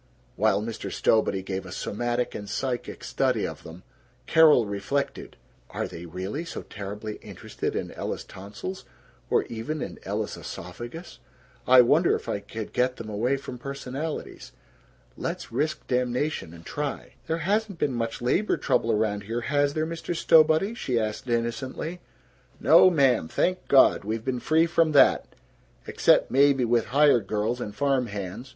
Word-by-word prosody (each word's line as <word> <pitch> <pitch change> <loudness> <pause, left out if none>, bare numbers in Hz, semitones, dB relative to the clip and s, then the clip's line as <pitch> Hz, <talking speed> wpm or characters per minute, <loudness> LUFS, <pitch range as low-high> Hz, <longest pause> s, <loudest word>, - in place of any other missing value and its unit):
While 105 - +2
Mr. 115 0 -5
Stowbody 100 -3 +1
gave 95 0 -4
a 90 - -10
somatic 120 +5 -2
and 105 -1 -7
psychic 125 +2 -3
study - - 0
of - - -6
them, 85 +3 -12 0.4
Carol 155 -7 +6
reflected, 100 +8 -3 0.3
"Are - - -3
they 85 +1 -9
really 95 - -4
so 170 - -7
terribly 105 +1 -7
interested - - -6
in - - -3
Ella's - - -4
tonsils, 105 - -8 0.5
or - - +3
even 120 +8 -5
in - - -6
Ella's - - -3
esophagus? 120 - -8 0.5
I 130 0 +9
wonder 155 +8 +4
if - - -7
I - - -1
could 105 +2 -7
get 125 +1 +1
them 110 -1 -8
away 120 +6 0
from 130 -2 -8
personalities? 140 +3 -6 0.6
Let's - - -5
risk 150 +6 -2
damnation 125 - -1
and 85 0 -13
try." 145 -1 -4
"There 165 0 0
hasn't 205 -1 0
been 145 -5 0
much 115 0 -3
labor 185 - +1
trouble 125 -3 +1
around 105 -1 0
here, 115 +3 -3
has 145 +2 +1
there, 155 0 0
Mr. 165 +1 -4
Stowbody?" 160 +5 +4
she 125 - -1
asked 110 +3 -3
innocently. 130 +8 -2 0.6
"No, 185 - +7
ma'am, 135 - +3
thank 180 - -1
God, 135 - +5
we've 110 +2 -3
been 130 -2 -1
free 160 +6 +3
from 165 -2 +2
that, 140 - +5 0.6
except - - +3
maybe 135 -1 +4
with 120 -1 +2
hired 140 -6 +4
girls 110 +4 -1
and 105 -3 -5
farm 135 -2 +1
hands. 100 +4 -6
125 Hz, 155 wpm, -26 LUFS, 110-150 Hz, 0.6 s, I